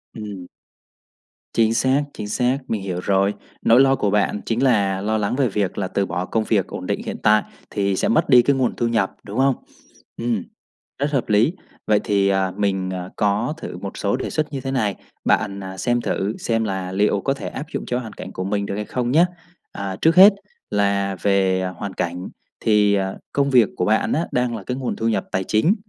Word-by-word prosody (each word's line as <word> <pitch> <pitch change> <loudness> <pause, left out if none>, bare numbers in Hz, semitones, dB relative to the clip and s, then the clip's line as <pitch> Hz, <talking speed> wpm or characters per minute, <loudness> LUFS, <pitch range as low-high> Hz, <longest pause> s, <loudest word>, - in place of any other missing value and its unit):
Ừm. 100 -5 -7 1.1
Chính 115 -1 +3
xác, 130 +4 +2
chính 105 - -6
xác. 125 +5 +1
Mình 110 -3 -2
hiểu 90 -2 -3
rồi. 100 +1 +2 0.3
Nỗi 115 +3 +5
lo 135 0 +5
của 105 - 0
bạn 105 0 +1
chính 115 +3 0
là 100 -7 +2
lo 110 +2 0
lắng 105 +3 -1
về 135 -2 +2
việc 100 -3 -1
là 95 -2 -1
từ 100 +1 0
bỏ 90 +1 -3
công 110 +3 0
việc 100 -5 +1
ổn - - -6
định - - -1
hiện - - -4
tại 105 0 +5 0.3
thì 100 -2 0
sẽ - - 0
mất 115 - +2
đi 125 -2 +8
cái 140 +3 +2
nguồn 130 -2 0
thu 120 - 0
nhập, 115 -5 0
đúng 105 +3 -7
không? 135 -1 +4 0.6
Ừm. 115 -5 -1 0.6
Rất 145 +1 0
hợp 130 -6 -1
lý. 110 +10 +3 0.3
Vậy 105 -1 +4
thì, 100 -1 +2
à, 95 -1 +1
mình, 95 -2 0
à, 90 0 -5
có 105 +6 +1
thử 90 - -7
một 95 +2 -7
số 100 +2 0
đề 130 - -3
xuất 155 -1 -2
như 135 - -3
thế 135 - -3
này, 110 -7 0 0.3
bạn, 100 0 +1
à, 95 0 -7
xem 120 +4 0
thử 100 -1 -2
xem 115 -1 0
là 95 -3 -3
liệu 100 +1 +1
có 135 - 0
thể 135 - -6
áp 145 - -6
dụng - - -3
cho 125 0 0
hoàn 110 -4 -8
cảnh - - -8
của 95 - -4
mình 100 +1 -1
được 100 - -4
hay 105 0 -3
không 125 -1 -2
nhá? 165 +5 +6 0.5
À, 100 -1 -4
trước 160 +1 +4
hết 195 +3 +9 0.4
là 100 -1 +1
về 95 -2 +2
hoàn 95 +2 -5
cảnh 90 +1 -3 0.3
thì, 105 -2 +3
à, 95 -1 -1 0.2
công 140 0 +2
việc 120 -6 +5
của 90 - +1
bạn 110 +1 +2
á 165 - 0
đang 125 -3 0
là 105 - -7
cái 125 +6 -3
nguồn 130 -2 -2
thu 115 - -1
nhập 110 -4 0
tài 95 0 0
chính, 110 - +2
105 Hz, 225 wpm, -22 LUFS, 100-125 Hz, 1.1 s, hết